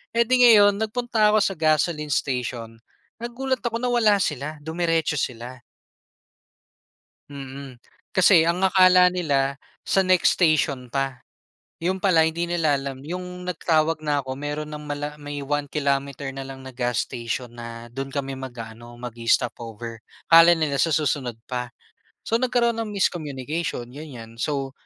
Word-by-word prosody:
E'di 235 +2 +3
ngayon, 205 -3 +6
nagpunta 220 -1 +1
ako 210 - +4
sa 195 - 0
gasoline 155 -1 +1
station 120 -5 -3 0.4
nagulat 255 +3 -2
ako 235 0 -1
na 250 - 0
wala 220 -5 +3
sila, 150 -1 -3
dumiretso 160 -1 0
sila. 125 0 -4 1.7
Mm. 135 -1 -8 0.4
Kasi 185 -4 +6
ang 170 +3 0
akala 185 -1 +6
nila, 140 -6 0 0.3
sa 195 - +3
next 185 -1 +4
station 145 -7 +1
pa. 135 -1 -2 0.6
'Yon 185 +2 -1
pala 165 -5 +4
hindi 165 +2 -2
nila 165 -4 +1
alam 135 -1 -6
'yong 180 +1 -6
nagtawag 165 -2 +1
na 145 -1 +1
'ko, 130 - -4
meron 150 +1 -4
ng 150 0 -7
mala 145 0 -4
may 145 0 -5
one 145 +1 -1
kilometer 140 -1 -1
na 135 - -5
lang 135 0 -9
na 130 - -9
gas 125 -1 0
station 120 +1 -4
na 115 0 -8
do'n 135 +1 -4
kami 135 -1 -3
mag-aano, 120 -2 -9
mag-i-stop 120 -1 0
over. 115 0 -8 0.3
Akala 165 +1 +8
nila 155 -3 0
sa 165 - +2
susunod 135 -6 0
pa. 125 -1 -3 0.6
So 230 +1 +1
nagkaroon 240 -2 +1
ng 220 - -5
miscommunication, 155 -6 -2
ganyan. 120 -6 -10
So, 135 -3 -2
150 Hz, 145 wpm, -24 LUFS, 130-180 Hz, 1.7 s, Akala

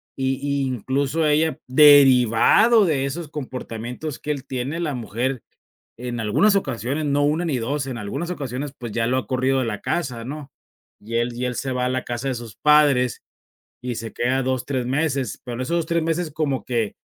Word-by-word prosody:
y 135 0 -1
y 140 -1 0
incluso 135 +5 -1
ella, 150 -1 +2
derivado 140 - +6
de 150 -6 +1
esos 160 +4 -4
comportamientos 130 0 -6
que 150 - -3
él 140 -3 -4
tiene, 130 +5 -3
la 160 -4 -1
mujer, 120 +2 -3 0.6
en 120 0 -4
algunas 195 - +3
ocasiones, 135 - -2
no 145 0 +1
1, 155 +4 +1
ni 150 -7 0
2, 135 +4 -2
en 130 -3 -5
algunas 115 - -4
ocasiones, 140 -4 -4
pues, 120 -2 -7
ya 115 +1 0
lo 125 +2 +1
ha 125 - -4
corrido 130 +1 +1
de 130 - -1
la 105 -2 -3
casa, 125 -9 -2
¿no?, 140 +2 -7 0.5
y 110 +3 -8
él 120 +1 0
y 125 +1 -3
él 125 0 -2
se 135 - -3
va 125 0 -1
a - - +1
la 130 0 -1
casa 120 +2 -4
de 130 - -1
sus 115 -3 -8
padres 145 -5 +3 0.6
y 125 -1 -4
se 115 0 -6
queda 130 +2 0
2, 130 -1 -1
tres 130 -3 -1
meses, 135 -3 -1
pero 120 - -5
en - - -5
esos 170 +7 0
2, 165 - -2
tres 170 0 0
meses 165 +1 -1
como 145 -3 -1
que, 115 -4 -2
130 Hz, 205 wpm, -22 LUFS, 125-150 Hz, 0.6 s, derivado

